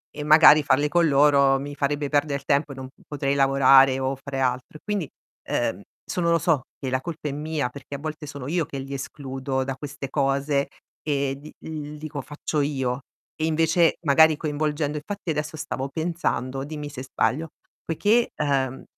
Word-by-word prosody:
e 150 Hz, -, -4 dB
magari 155 Hz, 0 st, +8 dB
farle 145 Hz, +1 st, +2 dB
con 170 Hz, 0 st, +3 dB
loro 140 Hz, -1 st, +4 dB
mi 145 Hz, +1 st, -6 dB
farebbe 145 Hz, 0 st, -1 dB
perder 145 Hz, -1 st, 0 dB
tempo, 140 Hz, +1 st, +1 dB
e -, -, -12 dB
non 130 Hz, 0 st, -7 dB
p 130 Hz, -, -22 dB
potrei 140 Hz, -2 st, -1 dB
lavorare 135 Hz, -1 st, +5 dB
o 135 Hz, +1 st, -1 dB
fare 135 Hz, 0 st, -6 dB
altro. 130 Hz, +3 st, -1 dB
E -, -, -23 dB
quindi, 205 Hz, -8 st, -2 dB, 0.4 s
ehm, -, -, -1 dB, 0.2 s
sono 170 Hz, -2 st, -1 dB
lo 170 Hz, -, +4 dB
so, 165 Hz, -4 st, +2 dB, 0.2 s
che 130 Hz, -, -3 dB
la 130 Hz, 0 st, 0 dB
colpa 155 Hz, -1 st, -5 dB
è -, -, -3 dB
mia 150 Hz, -2 st, -2 dB
perché 140 Hz, +2 st, -9 dB
a -, -, -3 dB
volte 155 Hz, +1 st, -6 dB
sono 140 Hz, -2 st, -7 dB
io 165 Hz, +1 st, 0 dB
che 145 Hz, -, -6 dB
li 135 Hz, +1 st, -6 dB
escludo 135 Hz, -1 st, -3 dB
da 135 Hz, 0 st, -4 dB
queste 140 Hz, 0 st, -7 dB
cose 140 Hz, 0 st, +1 dB, 0.4 s
e 140 Hz, -2 st, 0 dB
d 150 Hz, +2 st, -12 dB, 0.2 s
l 150 Hz, -1 st, -6 dB
dico: 150 Hz, -2 st, -6 dB
"Faccio 150 Hz, +2 st, -3 dB
io". 135 Hz, -3 st, -1 dB, 0.3 s
E 155 Hz, -, -1 dB
invece 165 Hz, +1 st, +3 dB
magari 160 Hz, +1 st, +5 dB
coinvolgendo 150 Hz, 0 st, -1 dB
infatti 180 Hz, +3 st, -4 dB
adesso 150 Hz, +1 st, -3 dB
stavo 135 Hz, -2 st, -4 dB
pensando, 135 Hz, -5 st, -2 dB
dimmi 150 Hz, 0 st, -6 dB
se 135 Hz, -3 st, -7 dB
sbaglio, 135 Hz, +4 st, -1 dB, 0.3 s
poiché, 210 Hz, +8 st, +2 dB
ehm, 135 Hz, -3 st, -1 dB
145 Hz, 185 wpm, -24 LUFS, 135-155 Hz, 0.4 s, magari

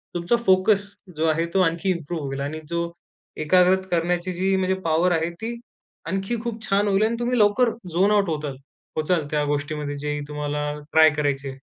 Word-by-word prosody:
तुमचा 175 Hz, +7 st, +1 dB
फोकस 195 Hz, +2 st, +4 dB, 0.3 s
जो 160 Hz, -, +1 dB
आहे 165 Hz, +2 st, +1 dB
तो 190 Hz, -, +3 dB
आणखी 170 Hz, +2 st, +1 dB
इम्प्रूव्ह 165 Hz, -2 st, -4 dB
होईल 135 Hz, 0 st, -4 dB
आणि 150 Hz, +3 st, -4 dB
जो 170 Hz, 0 st, -2 dB, 0.5 s
एकाग्रत 185 Hz, +2 st, +4 dB
करण्याची 175 Hz, +1 st, 0 dB
जी 190 Hz, +2 st, +1 dB
म्हणजे 190 Hz, 0 st, +1 dB
पॉवर 165 Hz, +3 st, +2 dB
आहे 165 Hz, 0 st, 0 dB
ती 230 Hz, +2 st, -3 dB, 0.5 s
आणखी 195 Hz, +6 st, -2 dB
खूप 225 Hz, -2 st, -5 dB
छान 200 Hz, +1 st, +2 dB
होईल 200 Hz, +1 st, +3 dB
आणि 230 Hz, +1 st, 0 dB
तुम्ही 240 Hz, 0 st, 0 dB
लवकर 210 Hz, +4 st, +4 dB, 0.2 s
झोन 195 Hz, +4 st, +3 dB
आउट 200 Hz, -4 st, +3 dB
होताल 150 Hz, -3 st, -3 dB, 0.4 s
पोहोचाल 155 Hz, 0 st, +1 dB
त्या 150 Hz, -1 st, +1 dB
गोष्टीमध्ये 145 Hz, 0 st, -2 dB
जे 150 Hz, 0 st, -2 dB
तुम्हाला 150 Hz, 0 st, -2 dB, 0.2 s
ट्राय 160 Hz, 0 st, +7 dB
करायची 140 Hz, -2 st, -1 dB
आहे. 135 Hz, 0 st, -10 dB
170 Hz, 180 wpm, -23 LUFS, 150-195 Hz, 0.5 s, ट्राय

